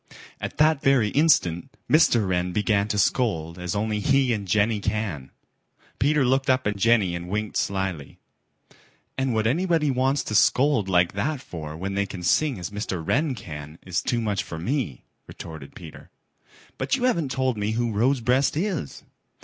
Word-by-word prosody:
At - - -6
that 155 -1 +3
very 130 -6 +3
instant 135 - +2
Mr. 135 - +4
Wren 90 -1 -1
began 105 0 +1
to 105 - -2
scold 90 -8 0
as 90 +1 -3
only 105 +1 -1
he 135 +1 +2
and 100 -3 -4
Jenny 105 +3 +2
can. 100 -10 -3 0.7
Peter 145 0 +3
looked 135 +1 +1
up 130 0 +2
at 105 -1 0
Jenny 105 -3 +3
and 85 0 -5
winked 105 +2 -3
slyly. 95 -7 -2 1.0
"And 130 -3 -1
what 110 0 +1
anybody 160 +3 +1
wants 135 +2 +1
to - - -5
scold 125 -1 +3
like 90 -2 +3
that 140 +9 -2
for 80 - -8
when 95 +3 -4
they 100 0 0
can 90 -2 -8
sing 140 - +2
as 90 +3 -6
Mr. 105 -3 -4
Wren 145 -1 +1
can, 75 -5 -9
is 90 -2 -1
too 120 -1 -1
much 105 -4 -1
for 80 - -7
me," 100 - -3 0.2
retorted 80 -4 -10
Peter. 80 -4 -12 0.7
"But - - +1
you 255 - -4
haven't 170 - +1
told 130 -1 0
me 105 +1 -2
who 120 0 -1
Rosebreast 125 +5 +1
is." 180 - -3
110 Hz, 170 wpm, -24 LUFS, 90-135 Hz, 1.0 s, Mr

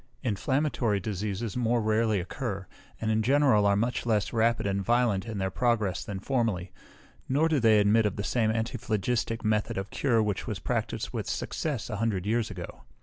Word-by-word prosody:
Inflammatory 125 -1 0
diseases 105 +2 -3
more 120 -1 +1
rarely 110 -1 +2
occur, 100 +1 -4 0.3
and 110 0 0
in 110 0 +2
general 130 -4 +4
are 100 - +4
much 120 +4 0
less 110 -2 0
rapid 115 -1 +2
and 100 0 0
violent 115 -2 +1
in 110 -2 -4
their 95 -1 -1
progress 115 -6 0
than 100 -2 -5
formerly; 105 -6 -1 0.6
nor 145 +5 +3
do 155 -3 +2
they 110 -3 +5
admit 105 +2 +4
of 100 - -3
the 100 - -3
same 110 0 +1
antiphlogistic 115 0 -1
method 110 -2 0
of 95 0 -4
cure 115 -5 +2
which 105 -2 -2
was - - -2
practised - - -2
with - - -4
success 145 -8 -3
a 110 - -4
hundred 100 -4 -1
years 115 +1 0
ago. 90 -3 -8
110 Hz, 180 wpm, -28 LUFS, 100-120 Hz, 0.6 s, they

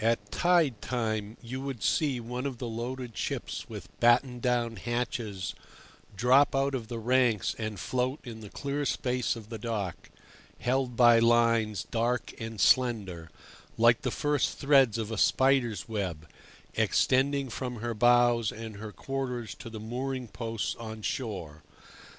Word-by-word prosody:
At 110 -3 0
tide 165 - +2
time 110 -3 -2
you 130 +3 -5
would 135 -5 -5
see 140 -5 +1
one 125 +3 -4
of 130 -3 -5
the 120 - -4
loaded 120 +1 -5
ships - - -4
with - - -8
battened 120 +1 +3
down 120 -2 0
hatches 115 -4 -3 0.6
drop 130 +7 +4
out 135 +1 +1
of 120 -4 -3
the 120 - -5
ranks 120 -2 +2
and 110 -3 -4
float 130 - -1
in 115 -3 -8
the 105 - -9
clear 140 +5 -3
space 125 -1 0
of 110 -2 -10
the 115 -2 -6
dock, 105 -5 -4 0.5
held 125 -1 0
by 120 -1 +7
lines 115 -2 +3
dark 120 +2 0
and 110 -1 -6
slender, 100 -11 +2 0.5
like 115 +5 +5
the 130 - -1
first 145 +3 0
threads 135 -5 +4
of 110 -1 -3
a 110 - -2
spider's 130 -8 +2
web, 90 -8 -3 0.5
extending 135 +1 +2
from 125 +1 -4
her 120 +1 -3
bows 120 0 +4
and 110 -2 -8
her 110 +1 -7
quarters 125 -3 -4
to 115 - -10
the 110 -1 -7
mooring 125 +3 -4
posts 115 -1 -3
on 110 -2 -7
shore. 90 - -4
120 Hz, 150 wpm, -29 LUFS, 110-130 Hz, 0.6 s, by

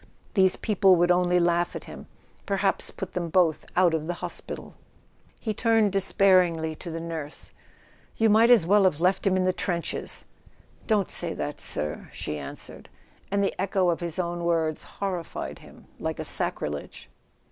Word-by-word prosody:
These 190 -2 +4
people 195 -3 +3
would 175 +1 +3
only 180 0 +3
laugh 175 0 +1
at - - -5
him—perhaps 195 -1 -2
put 190 - -7
them 175 -2 -2
both 165 -2 +2
out 180 -2 +4
of 160 -1 -2
the 175 - -2
hos¬ - - -5
pital! - - -7 0.7
He 220 - -2
turned 225 -2 +2
despairingly 185 -4 +3
to 170 +3 -8
the 165 0 -4
nurse. 165 -3 -6 0.7
"You 225 - +3
might 220 +2 +5
as 235 -9 +6
well 200 +2 +4
have 170 -5 +2
left 185 +3 +2
him 190 -1 +3
in 185 - +1
the 185 0 +2
trenches." 170 -2 -1 0.6
"Don't 210 -4 +1
say - - -1
that, - - -4
sir," 75 0 -2
she 75 - -4
answered; 70 - -8 0.4
and 200 0 +1
the 195 - 0
echo 190 -1 +1
of 170 - 0
his 170 -2 -3
own 175 -1 -2
words 165 -2 0
horrified 185 -5 -5
him - - -16
like - - -3
a - - -5
sacrilege. 75 -1 -2
180 Hz, 170 wpm, -26 LUFS, 165-195 Hz, 0.7 s, as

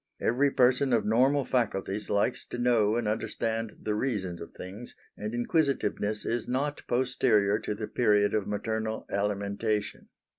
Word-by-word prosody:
Every 135 +5 +2
person 130 0 +3
of 115 - +2
normal 130 +6 +3
faculties 105 -4 -1
likes 100 +4 +1
to - - -6
know 115 -3 +3
and 120 -2 -1
understand 110 +1 -2
the 105 - 0
reasons 105 -7 -2
of 85 - -8
things; 100 +7 -9 0.2
and 105 +1 -5
inquisitiveness 120 -6 0
is 115 -1 -1
not 140 +4 -1
posterior 120 -5 +2
to 105 - -3
the 105 0 -5
period 105 -4 +2
of 105 -2 0
maternal 110 +1 -2
alimentation. 100 +1 -2
110 Hz, 145 wpm, -28 LUFS, 105-125 Hz, 0.2 s, person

